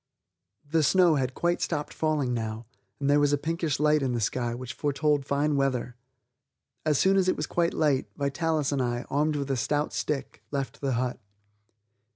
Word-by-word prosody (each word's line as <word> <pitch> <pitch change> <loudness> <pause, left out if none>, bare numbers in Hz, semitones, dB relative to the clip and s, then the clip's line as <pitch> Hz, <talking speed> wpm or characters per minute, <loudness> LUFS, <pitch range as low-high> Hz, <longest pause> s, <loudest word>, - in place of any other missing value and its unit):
The 160 +2 +2
snow 175 +3 +5
had 130 -1 -1
quite 175 0 0
stopped 150 -3 -2
falling 150 -5 0
now 110 0 -3 0.3
and 140 - -1
there 145 +1 +5
was 145 0 +3
a - - +4
pinkish 160 -1 -1
light 150 0 +3
in 130 -2 0
the 120 - 0
sky 120 +2 -1
which 125 0 -6
foretold 145 0 0
fine 145 +1 +1
weather. 130 -3 0 0.9
As 150 -2 +2
soon 195 +5 +4
as 190 -1 +3
it - - +1
was 150 - -1
quite 170 +3 0
light, 145 -4 +2
Vitalis 150 +1 0
and 140 -2 0
I, 120 -1 -1
armed 150 +2 +1
with 140 -1 -2
a - - +1
stout 145 +4 0
stick, 145 -3 -3
left 135 -5 -4
the 135 -2 0
hut. 125 +1 -1
145 Hz, 190 wpm, -27 LUFS, 130-155 Hz, 0.9 s, snow